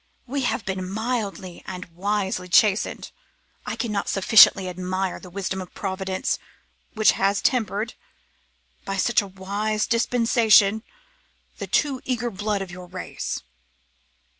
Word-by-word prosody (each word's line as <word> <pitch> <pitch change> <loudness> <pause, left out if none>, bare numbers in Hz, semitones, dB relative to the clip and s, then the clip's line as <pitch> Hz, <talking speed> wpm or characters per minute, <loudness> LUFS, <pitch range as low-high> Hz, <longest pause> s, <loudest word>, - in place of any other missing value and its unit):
We 275 +2 -2
have 240 - -1
been 185 -1 -3
mildly 210 -4 -3
and 180 0 -6
wisely 190 +1 -2
chastened. 205 +2 +2 0.6
I - - -2
cannot 210 -5 -2
sufficiently 195 -1 +6
admire 185 +1 -3
the 180 - -12
wisdom 190 0 -3
of 185 - -11
Providence, 190 -1 -2 0.6
which 215 0 +5
has 200 0 +1
tempered, 220 -1 0 0.9
by 195 0 -3
such 235 +5 +3
a 200 - -7
wise 200 +3 -2
dispensation, 230 -3 +4 0.8
the - - -4
too 275 -3 +1
eager 240 -2 -2
blood 205 0 -2
of 185 - -10
your 180 0 -9
race. 180 - -5
200 Hz, 125 wpm, -24 LUFS, 190-220 Hz, 0.9 s, sufficiently